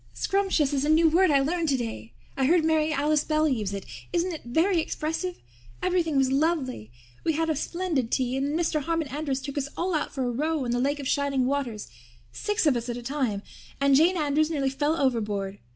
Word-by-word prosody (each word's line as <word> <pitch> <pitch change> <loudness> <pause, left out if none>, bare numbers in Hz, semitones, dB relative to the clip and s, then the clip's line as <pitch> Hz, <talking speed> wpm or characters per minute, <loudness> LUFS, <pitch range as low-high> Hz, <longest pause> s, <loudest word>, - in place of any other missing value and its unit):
Scrumptious 380 -8 +1
is 275 -1 +1
a 295 - 0
new 320 +1 +5
word 360 +4 +4
I 280 -2 +4
learned 325 +3 0
today. 225 - -3 0.2
I 265 - +1
heard 335 +1 +4
Mary 315 -1 +2
Alice 300 +1 +2
Bell 310 0 +1
use 220 -8 -1
it. 200 -1 -5 0.3
Isn't 350 +1 0
it 315 - -7
very 330 +9 +2
expressive? 325 +4 -3 0.5
Everything 345 -5 +1
was 265 -1 +3
lovely. 270 - 0 0.3
We 320 - +1
had 325 +1 0
a - - 0
splendid 315 -5 -1
tea 255 0 0
and 270 +1 0
then 295 +2 -1
Mr. 325 -2 0
Harmon 330 0 -1
Andrews 275 -1 -3
took 285 +1 -3
us 280 0 -3
all 360 +1 -1 0.2
for 270 - -3
a 245 - 0
row 300 +3 -1
on 240 - -1
the 245 - +1
Lake 285 +3 0
of 275 - -4
Shining 280 -2 +1
Waters 255 -6 -2 0.4
six 415 - -1
of 290 -4 +4
us 235 +1 -3
at 240 - -3
a 245 - -7
time. 240 -6 -2 0.4
And 280 0 +4
Jane 340 +6 +4
Andrews 305 0 +1
nearly 275 -4 0
fell 295 +4 0
overboard. 210 -7 -1
290 Hz, 215 wpm, -26 LUFS, 260-320 Hz, 0.5 s, new